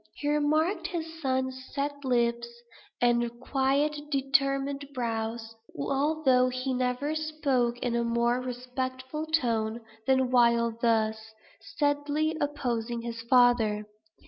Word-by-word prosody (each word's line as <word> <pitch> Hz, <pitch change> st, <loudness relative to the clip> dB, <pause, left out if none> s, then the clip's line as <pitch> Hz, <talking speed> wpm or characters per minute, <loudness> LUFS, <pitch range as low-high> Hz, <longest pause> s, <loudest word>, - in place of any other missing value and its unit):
He 290 Hz, -, -4 dB
remarked 305 Hz, +5 st, +1 dB
his 325 Hz, -3 st, -5 dB
son's 260 Hz, -1 st, -1 dB
set 285 Hz, 0 st, -2 dB
lips, 235 Hz, -2 st, +1 dB, 0.5 s
and 240 Hz, -1 st, +1 dB
quiet 285 Hz, +3 st, 0 dB
determined 275 Hz, 0 st, +1 dB
brow, 225 Hz, -2 st, -2 dB, 0.4 s
although 270 Hz, -, +2 dB
he 255 Hz, +1 st, -2 dB
never 255 Hz, +4 st, -1 dB
spoke 285 Hz, -6 st, 0 dB
in 240 Hz, -1 st, 0 dB
a 235 Hz, -, +1 dB
more 235 Hz, +1 st, +1 dB
respectful 255 Hz, +4 st, -4 dB
tone, 235 Hz, -7 st, 0 dB, 0.3 s
than 260 Hz, -1 st, +3 dB
while 235 Hz, -2 st, +4 dB
thus 220 Hz, -1 st, 0 dB, 0.3 s
steadily 290 Hz, +5 st, 0 dB
opposing 240 Hz, -5 st, -2 dB
his 230 Hz, -1 st, -5 dB
father. 235 Hz, -3 st, +3 dB
255 Hz, 110 wpm, -28 LUFS, 235-290 Hz, 0.5 s, while